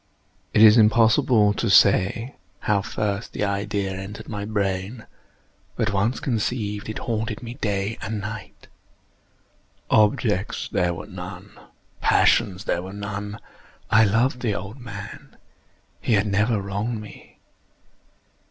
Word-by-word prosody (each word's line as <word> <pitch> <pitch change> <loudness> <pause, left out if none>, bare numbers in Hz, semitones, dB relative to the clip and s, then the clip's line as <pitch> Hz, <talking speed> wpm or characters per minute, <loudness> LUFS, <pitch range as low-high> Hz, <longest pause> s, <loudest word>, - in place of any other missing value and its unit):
It 105 - +5
is 110 +1 +8
impossible 110 -1 +4
to 115 +2 -1
say 100 +6 +4 0.3
how 100 -2 +1
first 100 +1 -3
the - - -2
idea 100 0 -1
entered 95 +2 -7
my 100 -2 -4
brain; 100 +2 -2 0.7
but 110 -1 -1
once 105 +6 0
conceived, 110 -4 -2
it 110 - -4
haunted 110 -1 -3
me 120 0 -6
day 105 -4 -2
and 110 +1 -3
night. 105 +1 -8 1.2
Object 105 -2 +1
there 85 -1 +1
was - - -9
none. - - -9 0.5
Passion 105 -6 +3
there 85 - 0
was 95 +2 -8
none. 105 +1 -5 0.5
I 110 +1 +6
loved 115 +5 +2
the 110 -5 -1
old 100 +7 -7
man. 105 -5 -9 0.6
He 120 - 0
had 100 -1 +3
never 105 +2 +1
wronged 100 +4 -3
me. 105 -1 -13
105 Hz, 125 wpm, -23 LUFS, 100-110 Hz, 1.2 s, is